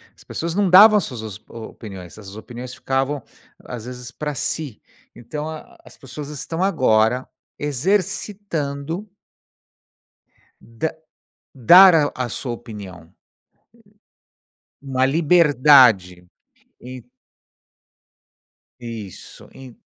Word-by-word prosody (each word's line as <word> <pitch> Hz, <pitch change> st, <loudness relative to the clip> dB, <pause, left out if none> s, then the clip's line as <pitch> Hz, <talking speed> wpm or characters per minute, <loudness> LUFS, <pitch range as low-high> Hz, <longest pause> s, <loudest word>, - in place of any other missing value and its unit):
As -, -, -19 dB
pessoas 165 Hz, 0 st, -4 dB
não 200 Hz, -2 st, +2 dB
davam 210 Hz, +4 st, +8 dB
as 200 Hz, -, 0 dB
suas 110 Hz, -5 st, -7 dB
o 115 Hz, -, -9 dB
opiniões, 95 Hz, -7 st, -11 dB
as 100 Hz, -1 st, -11 dB
opiniões 125 Hz, +3 st, -9 dB
ficavam 135 Hz, +2 st, -2 dB, 0.4 s
às 120 Hz, -2 st, -8 dB
vezes 125 Hz, 0 st, -8 dB
pra 150 Hz, +1 st, -5 dB
si. 140 Hz, -3 st, -3 dB, 0.3 s
Então, 150 Hz, +6 st, -6 dB
a 155 Hz, -1 st, -10 dB
as -, -, -17 dB
pessoas 140 Hz, +2 st, -9 dB
estão 165 Hz, +4 st, -4 dB
agora 125 Hz, -, +2 dB, 0.3 s
exercitando 165 Hz, -, -2 dB, 1.5 s
da 115 Hz, +8 st, -5 dB, 0.6 s
dar 165 Hz, -, +7 dB
à 125 Hz, -1 st, -3 dB
sua 120 Hz, +2 st, -5 dB
opinião. 100 Hz, -8 st, -10 dB, 1.7 s
Uma 130 Hz, -2 st, 0 dB
liberdade. 135 Hz, -, +4 dB, 0.5 s
En 125 Hz, -1 st, -10 dB, 1.8 s
Isso, 115 Hz, -5 st, -10 dB
en 130 Hz, -3 st, -13 dB
130 Hz, 95 wpm, -21 LUFS, 115-155 Hz, 1.8 s, davam